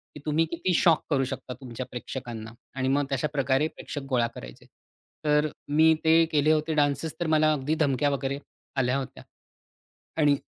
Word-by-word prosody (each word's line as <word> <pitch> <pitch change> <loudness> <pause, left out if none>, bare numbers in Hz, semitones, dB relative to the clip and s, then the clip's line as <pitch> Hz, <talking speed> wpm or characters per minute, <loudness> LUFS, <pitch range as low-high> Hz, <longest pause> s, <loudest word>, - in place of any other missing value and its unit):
की 150 - -8
तुम्ही 155 +2 +2
किती 180 +2 -1
शॉक 165 -1 +4
करू 135 -3 +2
शकता 130 0 -6
तुमच्या 125 0 -6
प्रेक्षकांना 120 -3 -6 0.2
आणि 130 -1 -1
मग 140 +2 +2
तशाप्रकारे 140 0 +1
प्रेक्षक 145 -2 -7
गोळा 120 -2 +2
करायचे. - - -10 0.6
तर 150 0 +3 0.2
मी 160 +2 +5
ते 165 +1 +5
केले 150 0 +3
होते 155 +1 +1
डान्सेस 145 +1 +1
तर 175 - -1
मला 155 0 +4
अगदी 150 +2 -1
धमक्या 145 -1 +2
वगैरे 140 0 -2 0.4
आल्या 125 +1 +2
होत्या. 135 - -6 0.9
आणि 145 -2 +4
145 Hz, 160 wpm, -27 LUFS, 130-155 Hz, 0.9 s, मी